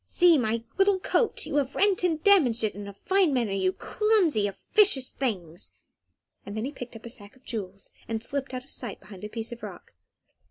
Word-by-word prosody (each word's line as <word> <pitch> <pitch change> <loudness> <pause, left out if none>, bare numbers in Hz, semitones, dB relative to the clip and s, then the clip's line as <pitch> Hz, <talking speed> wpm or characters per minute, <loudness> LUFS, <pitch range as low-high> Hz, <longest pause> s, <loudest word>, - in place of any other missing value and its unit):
See 350 -2 +4
my 230 -4 0 0.2
little 390 0 +4
coat; 455 +4 0
you 295 - -2
have 275 -2 0
rent 395 -3 +2
and 325 -3 0
damaged 280 - +4
it 215 - 0
in 205 0 -8
a 200 - -8
fine 380 -4 +3
manner, 240 -6 0
you 190 -1 +1
clumsy, 365 - +1
officious 285 - +3
things!" 180 - -4 0.7
Then 215 +3 -4
he 275 - -4
picked 245 -5 -9
up 225 - -11
a - - -6
sack 205 -1 -8
of 260 - -24
jewels, 195 -5 -5 0.2
and 225 0 -3
slipped 275 +1 -3
out 255 -1 -5
of 275 - -14
sight 240 -6 -5
behind 195 -1 -13
a 210 - -5
piece 225 +1 -4
of 235 - -8
rock. - - -10
245 Hz, 205 wpm, -27 LUFS, 210-325 Hz, 0.7 s, See